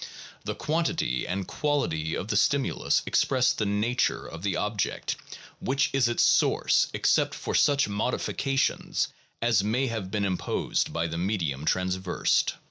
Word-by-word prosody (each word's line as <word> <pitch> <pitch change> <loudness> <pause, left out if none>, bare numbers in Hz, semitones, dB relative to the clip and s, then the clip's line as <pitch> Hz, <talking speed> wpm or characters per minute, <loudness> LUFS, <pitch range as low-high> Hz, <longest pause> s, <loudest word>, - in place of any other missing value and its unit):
The - - -3
quantity 155 - -1
and 95 +1 -3
quality 85 - -1
of 100 - -5
the 105 - 0
stimulus 135 +6 +2
express 130 -2 +2
the 105 - -1
nature 105 +5 0
of 85 +1 -8
the 100 -1 -1
object 105 -1 -2 0.4
which 135 +2 0
is 135 -3 +3
its 120 - +2
source - - +3
except - - +1
for - - -4
such 145 -3 +3
modifications 125 +5 -1 0.3
as 115 -4 +3
may 120 +6 +1
have 110 -6 -3
been 105 0 -1
imposed 95 -2 -1
by 85 0 -1
the 85 0 -3
medium 85 -7 -1
traversed. 90 +1 +1
105 Hz, 140 wpm, -27 LUFS, 90-130 Hz, 0.4 s, is